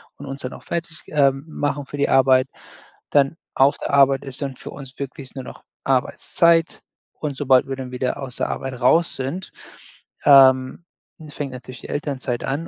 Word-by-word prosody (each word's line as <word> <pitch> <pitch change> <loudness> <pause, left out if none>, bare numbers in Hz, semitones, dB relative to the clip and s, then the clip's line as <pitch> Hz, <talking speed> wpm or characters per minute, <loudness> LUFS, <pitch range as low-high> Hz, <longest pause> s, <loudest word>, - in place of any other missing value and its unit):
und - - -10
uns 135 +1 -6
dann 125 - -5
auch - - -12
fertig, 165 -1 -5
ähm, 140 -2 +2
machen 145 -2 -3
für 145 - -8
die 140 - +2
Arbeit. 130 -1 +4 0.6
Dann 140 +2 +3 0.2
auf 135 +2 +4
der - - -4
Arbeit 140 -1 +4
ist 135 +1 -4
dann 135 -2 -4
für - - -10
uns 135 -1 -11
wirklich 135 -1 -7
nur 130 - -5
noch - - -11 0.2
Arbeitszeit 165 +5 +2 0.4
und 145 -3 -3
sobald 135 -2 +3
wir 135 - -3
dann 130 -1 -7
wieder 125 +2 -2
aus 130 -2 -6
der - - -1
Arbeit 130 -2 -5
raus 165 +7 +3
sind, 145 +9 -5 0.7
ähm, 135 +2 +6 0.4
fängt 145 -2 -5
natürlich 125 0 -10
die - - -10
Elternzeit 135 -4 -3
an. 150 +5 -3
135 Hz, 180 wpm, -22 LUFS, 130-145 Hz, 0.7 s, ähm